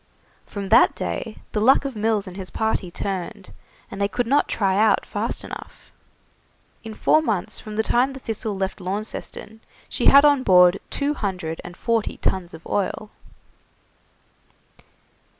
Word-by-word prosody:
From 200 -2 -6
that 230 +3 +6
day 225 -3 -4
the 210 - -1
luck 260 +6 +4
of 270 -3 -4
Mills 215 -1 0
and 185 -2 -9
his 190 -1 -7
party 220 -4 -1
turned, 190 0 -5 0.4
and 200 - -6
they 200 - +3
could 245 +4 -2
not 275 +5 +2
try 195 -3 0
out 215 +2 +3
fast - - -3
enough. - - -10 0.9
In 220 -1 -8
four 310 - +3
months 215 - -2
from 215 -1 -8
the 220 - +1
time 250 +4 +2
the 265 - -9
'Thistle' 220 -3 -4
left 190 0 -3
Launceston 210 +3 -5 0.3
she - - 0
had 280 +1 +8
on 285 -2 +5
board 180 -4 +5
two 285 +1 -1
hundred 185 - -4
and 175 - -10
forty 230 -2 -1
tuns 180 -3 -2
of 160 - -14
oil. 205 +1 -2
210 Hz, 155 wpm, -23 LUFS, 190-230 Hz, 0.9 s, had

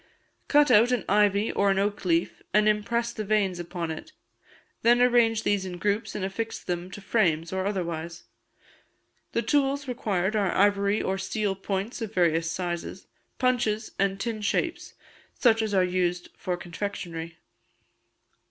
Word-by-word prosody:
Cut 295 0 +5
out 230 +4 +6
an 245 -5 0
ivy 205 +1 +3
or 200 0 +2
an 195 - +2
oak 200 0 -1
leaf, 170 -1 0
and 210 0 +5
impress 235 +3 0
the 215 - -4
veins 200 -4 +1
upon 170 -1 -4
it; 160 - -8 0.7
then 240 +1 +5
arrange 235 -3 +4
these 205 -2 +1
in 180 -1 -6
groups, 205 +3 -1
and 190 - -2
affix 225 +4 -3
them 175 0 -4
to 200 - -9
frames, 170 -6 +1
or 190 +1 -1
otherwise. 170 -4 -4 1.1
The - - 0
tools 280 -1 +1
required 210 -5 -1
are 200 -4 +1
ivory 200 +1 +2
or 190 0 -1
steel 200 +1 -1
points 195 +4 -4
of 220 -1 -5
various 165 -2 +2
sizes, 175 +1 -4 0.3
punches, 235 -4 0
and 195 0 +1
tin 225 0 -3
shapes, 205 - -2 0.4
such 225 -3 +4
as 220 -1 -1
are 190 -2 +3
used 180 -1 -1
for 180 -1 -3
confectionery. 170 -2 -6
200 Hz, 150 wpm, -26 LUFS, 180-220 Hz, 1.1 s, out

